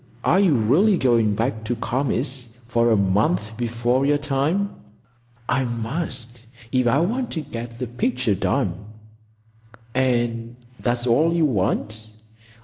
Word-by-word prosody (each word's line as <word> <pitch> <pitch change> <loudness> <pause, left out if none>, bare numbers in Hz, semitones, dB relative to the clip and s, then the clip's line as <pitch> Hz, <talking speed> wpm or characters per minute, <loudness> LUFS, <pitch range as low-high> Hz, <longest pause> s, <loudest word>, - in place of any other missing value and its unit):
"Are 185 - +4
you 185 -7 +4
really 155 - +3
going 115 -6 +2
back 110 0 -1
to 120 - -1
Kami's 130 +1 -2 0.2
for 120 0 +2
a 110 - +4
month 100 +2 +1
before 120 +2 0
your 145 +1 +3
time?" 150 +8 0 0.8
"I 130 +1 +1
must, 120 0 -4 0.3
if 130 -1 +2
I 120 - +3
want 240 +8 -1
to 160 - -2
get 115 -4 -7
the 125 - -3
picture 120 -1 0
done." 95 0 -1 1.1
"And 120 -2 0 0.2
that's 120 0 -1
all 145 +8 +3
you 165 -2 +3
want?" 110 -2 -1
120 Hz, 135 wpm, -22 LUFS, 115-140 Hz, 1.1 s, Are